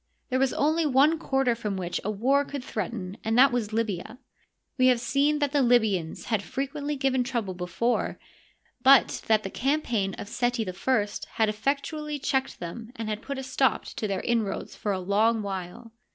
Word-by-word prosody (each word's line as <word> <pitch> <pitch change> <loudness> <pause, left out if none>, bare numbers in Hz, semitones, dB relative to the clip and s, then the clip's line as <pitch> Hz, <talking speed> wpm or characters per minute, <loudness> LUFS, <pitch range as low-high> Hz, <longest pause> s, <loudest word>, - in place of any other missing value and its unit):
There 260 - +2
was 265 -1 +2
only 315 +3 +2
one 295 +3 +4
quarter 270 -5 +1
from 210 -4 -3
which 175 -2 -3
a 210 - -2
war 260 +7 +2
could 280 -2 -6
threaten 205 -4 -4
and 225 +1 0
that 270 +2 +7
was 235 -4 -1
Libya. 215 -1 -2 0.6
We 255 -1 +4
have 250 -2 +4
seen 280 +5 +2
that 290 -2 0
the 290 -1 +2
Libyans 220 -10 +2
had 220 -4 0
frequently 280 +5 -3
given 265 -2 +1
trouble 235 -6 -2
before, 180 +7 -1 0.6
but 265 0 +5
that 215 -1 +3
the 195 - -5
campaign 240 -8 0
of - - -7
Seti 240 -1 -1
I 205 +4 0 0.3
had 220 -1 +2
effectually 290 +7 -2
checked 265 -1 -1
them 220 +7 -7
and 225 -3 -4
had 215 0 -3
put 280 +2 -5
a 265 - -4
stop 265 0 +1
to 215 - -4
their 195 -2 -2
inroads 230 -4 -1
for 210 - -2
a 195 - 0
long 215 +4 +2
while. 195 +4 -6
235 Hz, 180 wpm, -27 LUFS, 210-270 Hz, 0.6 s, that